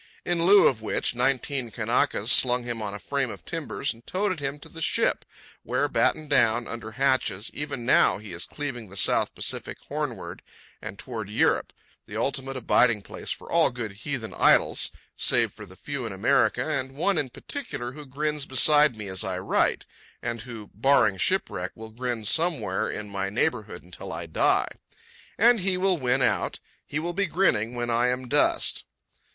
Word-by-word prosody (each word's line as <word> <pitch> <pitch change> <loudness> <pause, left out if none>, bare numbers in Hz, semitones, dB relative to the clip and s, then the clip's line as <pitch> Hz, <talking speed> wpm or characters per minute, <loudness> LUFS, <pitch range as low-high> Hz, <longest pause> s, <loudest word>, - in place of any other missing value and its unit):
In 175 -1 +1
lieu 200 +1 +8
of 115 -5 +3
which, 110 - -1
nineteen 130 0 0
Kanakas 115 0 +1
slung 125 -1 +5
him 120 -2 -4
on 100 -1 -4
a - - -4
frame 140 +4 -2
of - - -9
timbers 160 -4 -3
and 115 +1 -19
toted 185 -2 -1
him 140 0 -3
to - - -10
the 165 - -10
ship, - - +1 0.4
where, - - 0
battened 155 -1 +1
down 120 -3 +3
under 115 -1 -6
hatches, 130 -6 +1
even 140 -5 -5
now - - +5
he 105 -2 -9
is 85 -2 -1
cleaving 130 -8 -5
the 100 - -10
South - - +1
Pacific - - -4
Hornward - - -4 0.4
and 100 - -7
toward 110 -5 -6
Europe—the 105 - -1
ultimate 135 0 -2
abiding 120 -3 +3
place - - -8
for - - -5
all - - +4
good 120 -3 -5
heathen 110 +1 -5
idols, - - +4 0.2
save - - +1
for 105 - -11
the 95 - -13
few 140 +2 -5
in - - -6
America 95 - +2
and 130 0 -2
one 170 +4 +2
in 135 - -1
particular 125 - -5
who 150 +3 -9
grins 150 +1 -2
beside 150 +1 +5
me 110 -1 -7
as 95 -1 0
I 95 -1 -2
write, 95 - +1 0.3
and 115 -1 -4
who, 115 -3 -9
barring 110 -3 +3
shipwreck, 95 - -1
will 110 0 -10
grin 120 -1 -4
somewhere 160 - 0
in 105 -1 -5
my 100 -1 -3
neighbourhood 105 -3 -1
until 90 +1 -9
I 85 +1 -4
die. 80 - +2 0.7
And 235 +2 +5
he 185 -1 0
will 185 -2 +2
win 130 0 +2
out. - - 0 0.3
He 145 - -3
will 170 +2 -2
be 195 +2 0
grinning 125 - +1
when 120 0 -2
I 120 +1 +3
am 125 0 -1
dust. - - +2
125 Hz, 180 wpm, -26 LUFS, 110-145 Hz, 0.7 s, lieu